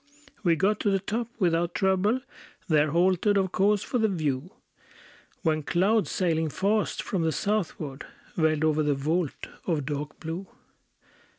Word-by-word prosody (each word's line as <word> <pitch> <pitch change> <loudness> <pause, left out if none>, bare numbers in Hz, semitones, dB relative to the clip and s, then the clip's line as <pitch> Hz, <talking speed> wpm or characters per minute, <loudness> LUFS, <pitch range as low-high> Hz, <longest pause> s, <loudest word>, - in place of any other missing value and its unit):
We 170 -3 +4
got 195 +6 +1
to 205 - +1
the 195 - +3
top 220 +4 -3
without 170 -3 +1
trouble; 195 +6 +2 0.5
There 155 -2 +3
halted, 185 +5 +3
of 190 -2 +1
course, 205 +2 +2
for 250 - -1
the 220 - +3
view; 155 -5 -1 0.9
When 155 -2 +1
clouds, 195 +8 +2
sailing 160 -3 0
fast 205 +7 0
from 190 - -1
the 160 0 +1
southward, 155 -5 -2 0.3
Veiled 155 -2 +2
over 155 -1 +3
the 150 -1 +1
vault 155 +3 -1 0.2
of 155 -6 0
dark 150 +1 -4
blue. 170 +4 -5
175 Hz, 150 wpm, -27 LUFS, 155-195 Hz, 0.9 s, We